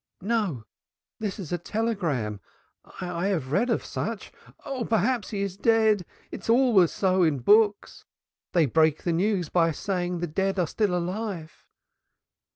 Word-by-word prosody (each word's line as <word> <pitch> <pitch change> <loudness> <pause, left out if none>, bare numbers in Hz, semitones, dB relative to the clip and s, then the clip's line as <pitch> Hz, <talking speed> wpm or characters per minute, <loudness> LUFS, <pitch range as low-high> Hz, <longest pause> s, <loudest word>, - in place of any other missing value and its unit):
"No, 200 - -1 0.6
this 205 -3 -3
is 185 -8 -7
a 175 - -1
telegram. 170 - -2 0.6
I 180 0 -2
have 160 -10 -2
read 240 - +2
of - - 0
such. - - -4 0.3
Oh! 265 -3 -3
perhaps 230 +1 0
he 200 -2 -2
is 195 -2 -4
dead. 220 -4 +3 0.2
It - - -7
is - - -9
always 230 -8 +5
so 190 -1 +1
in 160 -5 +3
books. 205 - +2 0.5
They 170 -3 +4
break 155 +2 +2
the 170 - 0
news 180 -1 0
by 165 -2 +3
saying 180 +2 -2
the 175 - -2
dead 190 +4 -1
are 180 - +2
still 190 +1 0
alive." 180 -2 -5
185 Hz, 155 wpm, -26 LUFS, 165-215 Hz, 0.6 s, always